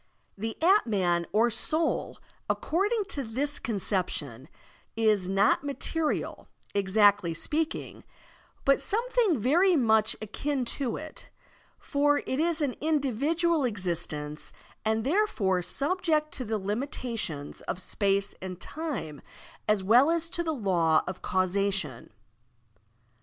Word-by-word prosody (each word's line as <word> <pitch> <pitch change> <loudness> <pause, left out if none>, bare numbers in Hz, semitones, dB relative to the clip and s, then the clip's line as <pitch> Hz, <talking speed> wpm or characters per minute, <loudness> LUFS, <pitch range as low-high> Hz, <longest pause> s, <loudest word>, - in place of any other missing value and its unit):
The 220 +2 -4
dtman 205 - +3
or 230 +3 +3
soul, 315 +8 0 0.3
according 410 +6 +1
to 280 -6 -3
this 270 +6 0
conception, 180 - -2 0.5
is 215 -5 +2
not 195 +7 +3
material, 300 +2 -2 0.3
exactly 200 -3 +3
speaking, 310 - -3 0.6
but 275 0 +4
something 450 - +2
very 345 - +4
much 220 -5 +3
akin 260 +5 -2 0.2
to 245 -5 -1
it, 310 0 -9 0.5
for 290 0 +2
it 260 - -2
is 330 0 +1
an 280 -4 0
individual 310 +2 +1
existence 170 -8 -2 0.3
and 220 0 +1
there 390 - +2
fore 190 - 0
subject 305 - 0
to 255 - -5
the 220 0 -1
limitations 210 - -4
of - - -2
space 200 +1 0
and 185 -1 -6
time 285 - -5 0.5
as 210 -2 +2
well 240 +9 +6
as 330 0 +1
to 345 - -1
the 325 - -1
law 175 - +2
of 185 - -6
causation. 185 -7 -1
230 Hz, 115 wpm, -28 LUFS, 195-305 Hz, 0.6 s, well